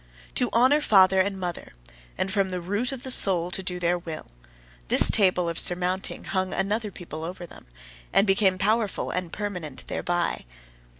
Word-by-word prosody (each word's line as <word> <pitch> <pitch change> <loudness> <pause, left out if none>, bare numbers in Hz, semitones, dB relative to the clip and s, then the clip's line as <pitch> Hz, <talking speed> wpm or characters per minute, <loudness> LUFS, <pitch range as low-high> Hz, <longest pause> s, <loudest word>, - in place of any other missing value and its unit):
"To - - +1
honour 260 +6 +4
father 190 -6 +5
and 195 0 -2
mother, 175 -2 -5 0.4
and 195 - -2
from 195 -1 0
the 180 -1 -3
root 205 +8 -2
of 265 -2 -7
the 260 - -1
soul 180 -7 +4
to 190 - 0
do 180 -1 -3
their 175 0 0
will" 160 - -8 0.6
this - - +5
table 185 -4 +3
of 170 -1 -3
surmounting 180 +1 -1
hung 185 -1 -2
another 210 +3 -1
people 165 -4 -8
over 175 +1 -6
them, 170 - -16 0.4
and 200 - +4
became 195 -1 +2
powerful 215 +1 0
and 180 -2 -3
permanent 180 -9 -6
thereby. 175 - -2
185 Hz, 170 wpm, -25 LUFS, 175-205 Hz, 0.6 s, father